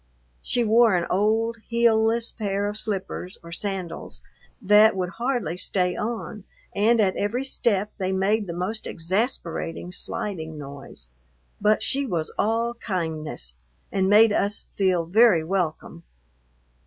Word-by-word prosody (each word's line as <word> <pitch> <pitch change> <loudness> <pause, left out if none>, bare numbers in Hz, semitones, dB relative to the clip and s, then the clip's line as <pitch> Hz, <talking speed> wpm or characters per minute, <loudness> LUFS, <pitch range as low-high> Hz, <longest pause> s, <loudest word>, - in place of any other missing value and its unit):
She 245 - +1
wore 225 -1 +5
an 175 -1 +1
old 220 +4 +1
heelless 230 0 +2
pair 200 -2 -2
of 205 - -4
slippers 195 -3 -4
or 170 - -11
sandals 180 - -5 0.4
that 210 +2 +5
would 180 -2 -2
hardly 235 - -2
stay 180 -1 0
on, 220 -2 -4 0.3
and 225 +3 +3
at 195 -3 +2
every 235 +6 -1
step 210 -6 0
they 190 -1 -1
made 200 +2 +1
the - - -4
most 185 +6 -3
exasperating 175 -2 -2
sliding 160 -4 -5
noise, 140 - -10 0.5
but 210 +1 +3
she 275 0 0
was 165 -7 -2
all 230 +2 +1
kindness 160 - -4 0.3
and 190 0 +1
made 210 +1 +6
us 205 0 0
feel 185 -4 +2
very 195 -2 +5
welcome. 170 -1 -2
200 Hz, 130 wpm, -24 LUFS, 180-225 Hz, 0.5 s, made